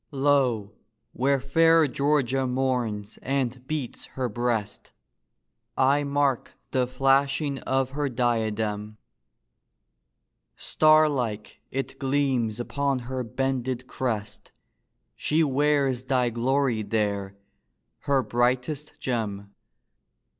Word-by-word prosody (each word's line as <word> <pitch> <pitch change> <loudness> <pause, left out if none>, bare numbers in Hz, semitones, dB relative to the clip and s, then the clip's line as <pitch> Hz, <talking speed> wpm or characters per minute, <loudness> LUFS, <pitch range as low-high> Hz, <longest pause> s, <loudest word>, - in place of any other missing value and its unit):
Lo, 135 -7 +1 0.4
where 135 +2 +2
fair 165 +4 +4
Georgia 135 -2 +1
mourns 125 -5 -2
and 130 -1 -2
beats 150 -6 -4
her 130 -1 0
breast, 115 -2 -2 0.9
I 140 +2 +3
mark 140 -2 0 0.2
the 125 -1 +1
flashing 135 +2 +1
of 130 0 -1
her 145 0 -1
diadem; 110 -3 -1 1.6
Star 155 0 +4
like 115 -7 -3
it 135 +1 -4
gleams 130 -5 0
upon 140 +2 -1 0.2
her 130 -1 -1
bended 130 +1 -2
crest: 110 -5 -4 0.6
She 160 +2 +1
wears 140 -3 +1
thy 125 -2 +1
glory 125 0 +1
there, 100 -2 -2 0.7
her 140 -2 +2
brightest 125 +5 0
gem. 100 -5 -3
130 Hz, 95 wpm, -26 LUFS, 115-140 Hz, 1.6 s, fair